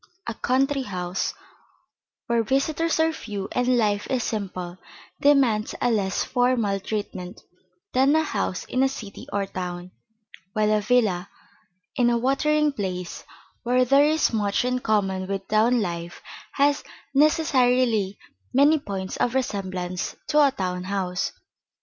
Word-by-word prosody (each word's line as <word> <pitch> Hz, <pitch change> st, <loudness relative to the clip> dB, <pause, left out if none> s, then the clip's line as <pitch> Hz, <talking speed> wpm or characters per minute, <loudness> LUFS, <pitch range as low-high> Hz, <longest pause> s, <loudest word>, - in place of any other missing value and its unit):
A -, -, -3 dB
country 270 Hz, +4 st, +1 dB
house, 180 Hz, -5 st, -3 dB, 0.9 s
where 235 Hz, -1 st, +2 dB
visitors 305 Hz, +7 st, 0 dB
are 320 Hz, 0 st, +3 dB
few 205 Hz, -8 st, -5 dB
and 250 Hz, 0 st, +2 dB
life 205 Hz, -3 st, 0 dB
is 255 Hz, -3 st, 0 dB
simple, 185 Hz, -5 st, -4 dB, 0.4 s
demands 260 Hz, -7 st, +3 dB
a 245 Hz, -, +2 dB
less 195 Hz, -4 st, 0 dB
formal 245 Hz, -6 st, +1 dB
treatment 195 Hz, -2 st, -5 dB, 0.5 s
than 270 Hz, +4 st, +4 dB
a 315 Hz, -, +3 dB
house 185 Hz, -10 st, -2 dB
in 255 Hz, -, -1 dB
a 270 Hz, -, +4 dB
city 215 Hz, -6 st, -8 dB
or 200 Hz, -1 st, 0 dB
town; 180 Hz, -1 st, -6 dB, 0.6 s
while 215 Hz, 0 st, +2 dB
a 210 Hz, -, +2 dB
villa 205 Hz, -5 st, +1 dB, 0.7 s
in 245 Hz, -3 st, +3 dB
a 235 Hz, -, +2 dB
watering 300 Hz, +4 st, +2 dB
place 180 Hz, -5 st, -4 dB, 0.4 s
where 250 Hz, +1 st, +2 dB
there 275 Hz, +3 st, +5 dB
is 310 Hz, -4 st, +2 dB
much 205 Hz, +1 st, +1 dB
in 250 Hz, 0 st, 0 dB
common 195 Hz, -5 st, 0 dB
with 195 Hz, 0 st, -4 dB
town 225 Hz, +3 st, +3 dB
life 170 Hz, -1 st, -5 dB, 0.3 s
has 285 Hz, 0 st, +2 dB, 0.3 s
necessarily 255 Hz, -8 st, +3 dB, 0.4 s
many 290 Hz, +3 st, +5 dB
points 195 Hz, -7 st, -5 dB
of 245 Hz, +1 st, 0 dB
resemblance 185 Hz, -8 st, -2 dB
to 300 Hz, 0 st, +2 dB
a 280 Hz, -, +5 dB
town 185 Hz, -7 st, -3 dB
house. 185 Hz, -2 st, -2 dB
225 Hz, 135 wpm, -24 LUFS, 195-265 Hz, 0.9 s, there